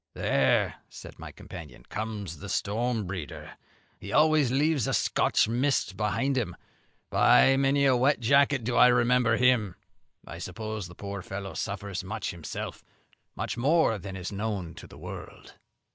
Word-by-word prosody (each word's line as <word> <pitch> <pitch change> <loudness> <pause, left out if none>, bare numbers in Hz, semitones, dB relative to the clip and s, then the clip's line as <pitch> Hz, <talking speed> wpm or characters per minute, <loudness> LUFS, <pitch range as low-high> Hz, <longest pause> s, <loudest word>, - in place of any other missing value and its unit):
"There," 65 -2 +2
said - - -12
my - - -8
companion, - - -11
"comes 105 -7 -5
the 100 - -8
storm 110 +3 -1
breeder; 90 -5 -7 0.4
he 100 - -8
always 150 -2 +4
leaves 145 -1 +1
a - - +1
Scotch - - +2
mist 120 -3 0
behind 125 +7 0
him. 95 -8 -4 0.6
By 135 - +5
many 140 +1 +2
a 130 -2 +5
wet 130 +3 +3
jacket 140 +2 +3
do 120 +2 -2
I 125 - +7
remember 120 -1 +3
him. 120 -7 +2 0.5
I - - -9
suppose 110 -3 -5
the 90 - -13
poor 100 0 -6
fellow 95 -1 -6
suffers 100 +2 -4
much 105 +2 -4
himself, 85 -3 -7 0.5
much - - -4
more 135 -4 +2
than 95 +1 -7
is 95 +1 -5
known 100 -4 -3
to - - -11
the - - -14
world." - - -10
110 Hz, 155 wpm, -28 LUFS, 95-130 Hz, 0.6 s, I